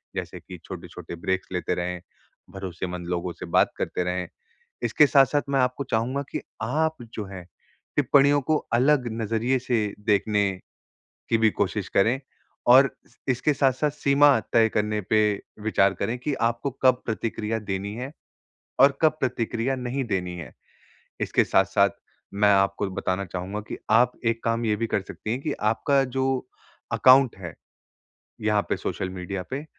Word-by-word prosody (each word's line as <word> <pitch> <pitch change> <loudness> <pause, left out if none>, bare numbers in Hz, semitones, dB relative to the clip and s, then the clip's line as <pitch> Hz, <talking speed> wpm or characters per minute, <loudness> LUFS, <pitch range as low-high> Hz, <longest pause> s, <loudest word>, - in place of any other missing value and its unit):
जैसे - - -5
कि - - -11
छोटे-छोटे - - -8
ब्रेक्स 95 +3 -2
लेते 90 - -1
रहें, 90 0 -3 0.5
भरोसेमंद 90 -2 -5
लोगों 90 0 -2
से - - -8
बात - - +3
करते 90 - -2
रहें। 90 0 -2 0.6
इसके 120 +6 +5
साथ-साथ 140 +1 +4
मैं 135 -1 +2
आपको 125 +2 0
चाहूँगा 125 +4 -1
कि - - -3 0.2
आप 155 +7 0 0.2
जो 105 - -4
है 95 -2 -9 0.5
टिप्पणियों 145 +1 +4
को 155 +4 +1 0.2
अलग 130 +1 +3
नज़रिए 115 +4 0
से 115 -5 -1
देखने 105 -1 +2 0.8
की 115 - +3
भी 110 -1 +5
कोशिश - - -2
करें 115 +7 +2 0.5
और 135 +2 +8 0.4
इसके 130 +4 +2
साथ-साथ 135 +1 +1
सीमा 140 -1 +4
तय 115 -1 +5
करने 105 0 0
पे 110 -1 +4 0.4
विचार 100 -3 +3
करें 115 +6 -2
कि 145 +4 -2 0.2
आपको 120 +4 -4
कब 130 -1 +4
प्रतिक्रिया 115 -1 -2
देनी 100 -1 -4
हैं, 125 +4 -5 0.7
और 135 +1 +6
कब 155 -1 +5
प्रतिक्रिया 125 0 -1
नहीं 130 +1 -3
देनी 90 -5 -2
हैं। 85 - -9 0.7
इसके - - +2
साथ-साथ - - +3 0.4
मैं 100 0 +4
आपको 100 +1 +1
बताना 95 +1 -2
चाहूँगा 95 +3 -5
कि - - -4
आप 120 +3 +5
एक 115 0 0
काम 115 0 0
ये 105 -1 +2
भी 115 +2 -2
कर 100 - 0
सकती 105 +2 -7
हैं 125 +3 -2
कि 155 - -2 0.2
आपका 135 +4 +2
जो 130 +1 -2 0.7
अकाउंट 130 -1 +6
है, 90 -4 -7 0.9
यहाँ 105 -1 +2
पे - - 0
सोशल 95 - -4
मीडिया 95 +1 -5
पे। 140 +3 -4
115 Hz, 155 wpm, -25 LUFS, 100-130 Hz, 0.9 s, और